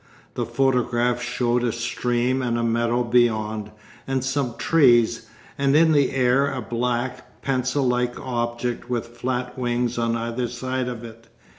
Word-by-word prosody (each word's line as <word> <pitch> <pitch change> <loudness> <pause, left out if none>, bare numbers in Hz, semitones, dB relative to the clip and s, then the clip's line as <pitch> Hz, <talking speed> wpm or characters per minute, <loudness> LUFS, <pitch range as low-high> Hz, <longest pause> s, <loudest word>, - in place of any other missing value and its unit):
The - - -3
photograph 125 -2 +1
showed 120 0 0
a 120 - +1
stream 120 +2 -1
and 120 -2 0
a 115 - -1
meadow 115 +1 +1
beyond, 110 -3 +1 0.4
and 135 -1 -1
some 135 -3 -1
trees, 120 -7 +3 0.3
and 140 0 +3
in 160 +1 +5
the 145 -3 +4
air 135 +2 +3
a 135 - -3
black, 120 +2 -3
pencil 130 +1 0
like 125 0 0
object 120 -1 -3
with 120 -1 -2
flat 125 +1 -3
wings 120 -1 -1
on 115 0 +1
either 115 +1 -2
side 130 +1 -3
of 120 -2 -5
it. 115 0 -11
125 Hz, 150 wpm, -23 LUFS, 120-130 Hz, 0.4 s, in